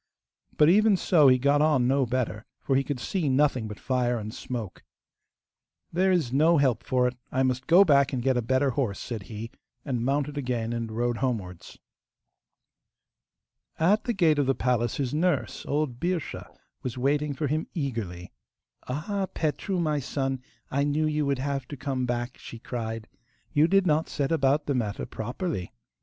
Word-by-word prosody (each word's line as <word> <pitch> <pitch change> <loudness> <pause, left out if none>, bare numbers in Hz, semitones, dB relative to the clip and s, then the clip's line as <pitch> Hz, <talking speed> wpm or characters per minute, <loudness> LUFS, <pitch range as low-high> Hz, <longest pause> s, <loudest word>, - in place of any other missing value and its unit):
But 150 - +6
even 205 +3 +5
so 160 -5 +4
he 130 -1 +6
got 140 +3 +3
on 150 -5 +3
no 135 0 +2
better, 120 -3 -2
for 135 - 0
he 135 - +3
could 140 -2 -4
see 160 +4 -1
nothing 130 -4 +2
but 105 -1 -8
fire 125 -2 0
and 110 0 -6
smoke. 120 -7 -6 1.1
'There 190 +3 +3
is 160 -9 +1
no 160 +4 +4
help 130 -5 +2
for 125 0 +2
it; 125 - -3 0.2
I 130 - +1
must 130 0 -1
go 180 +4 +7
back 140 -4 +4
and 125 -3 -2
get 130 0 +2
a 125 - +1
better 130 +4 +1
horse,' 120 -7 -1
said 115 -4 -5
he, 115 +1 -6 0.3
and 125 -5 -1
mounted 145 +2 0
again 120 -3 -2
and 115 -1 -3
rode 120 +1 -1
homewards. 105 -10 -4 2.0
At 195 +7 +3
the 240 - 0
gate 165 -7 +3
of 140 - +1
the 135 - +2
palace 120 -2 0
his 135 -2 -2
nurse, 175 +4 0
old 145 -4 -1
Birscha, 175 -2 -3 0.3
was 125 -1 -5
waiting 145 +3 0
for 150 - -2
him 155 +3 -1
eagerly. 110 - -4 0.6
'Ah, 190 +9 -2
Petru, 170 +4 -1
my 155 -3 +1
son, 135 -1 -2 0.3
I 140 +1 +1
knew 145 +2 +1
you 150 -1 0
would 140 -1 +1
have 140 0 -3
to 145 - -7
come 130 -1 -2
back,' 120 +1 -3
she 115 - -9
cried. 115 -2 -5 0.5
'You 155 +1 +5
did 195 +1 +3
not 155 -1 +1
set 140 0 -1
about 145 -1 +2
the 145 - 0
matter 110 -5 -2
properly. 120 - -4
135 Hz, 180 wpm, -27 LUFS, 120-150 Hz, 2.0 s, go